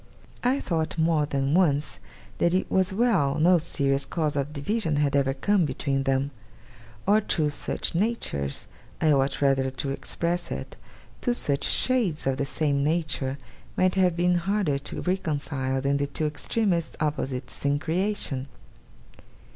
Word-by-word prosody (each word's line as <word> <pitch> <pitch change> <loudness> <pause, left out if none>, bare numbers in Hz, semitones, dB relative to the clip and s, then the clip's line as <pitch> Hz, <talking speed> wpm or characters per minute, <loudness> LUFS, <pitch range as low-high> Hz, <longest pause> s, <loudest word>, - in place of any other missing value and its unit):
I 255 +3 +2
thought, 165 - -2
more 160 -2 +2
than 140 0 0
once, 150 -6 +2 0.4
that 170 +1 +3
it 185 - -1
was 190 0 +2
well 190 - +2
no 175 +2 +5
serious 140 -3 +1
cause 155 -4 -2
of 140 +1 -1
division 160 +3 -1
had 145 -1 +1
ever 135 -1 +2
come 200 +5 +2
between 135 -1 -1
them; 135 +1 +1 0.7
or 210 +2 +4
two 155 -6 0
such 145 - -2
natures 170 - -1 0.3
I 155 - +3
ought 135 0 +1
rather 135 -1 +3
to 135 +1 -4
express 170 +5 -2
it, - - -5 0.5
two 245 -2 +1
such 140 -10 +1
shades 230 -12 +1
of 135 -1 +1
the 140 - 0
same 140 -1 0
nature 145 -4 -1 0.4
might 185 0 +3
have 185 -3 +3
been 175 0 +3
harder 190 -7 0
to 140 - -5
reconcile 145 -7 -1
than 140 +1 +1
the 140 0 -1
two 155 +2 -2
extremest 170 +3 -1
opposites 140 -4 -2
in 140 0 +2
creation. 160 -4 -1
150 Hz, 150 wpm, -26 LUFS, 140-180 Hz, 0.7 s, no